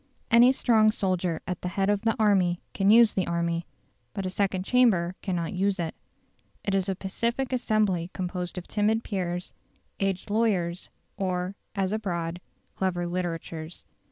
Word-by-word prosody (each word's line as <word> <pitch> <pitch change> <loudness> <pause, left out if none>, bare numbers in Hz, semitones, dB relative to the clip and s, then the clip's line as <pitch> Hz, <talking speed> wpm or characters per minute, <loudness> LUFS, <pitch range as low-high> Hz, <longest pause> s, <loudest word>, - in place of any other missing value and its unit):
Any 235 +2 +7
strong 225 -4 +4
soldier 185 -5 -1
at 180 -1 -4
the - - -3
head 195 +2 0
of 205 -1 +2
the 225 0 +1
army 190 -5 +3
can 195 0 +2
use 225 0 +7
the 190 - 0
army. 170 0 -1 0.5
But 195 -2 -3
a 185 - -2
second 190 -1 0
chamber 205 -9 +3
cannot 175 -4 -2
use 195 +1 0
it. 165 -2 -2 0.7
It 200 - -1
is 195 0 +1
a 190 - 0
pacific 235 +8 -2
assembly 210 -8 +1
composed 180 -1 -4
of 180 - -6
timid 220 +2 +1
peers, 180 -3 -3 0.5
aged 195 +1 -1
lawyers, 195 -6 0 0.3
or, 185 0 -2 0.2
as 195 0 0
abroad, 175 -5 -3 0.3
clever 180 -2 -1
litterateurs. 170 -2 -4
190 Hz, 155 wpm, -27 LUFS, 175-210 Hz, 0.7 s, Any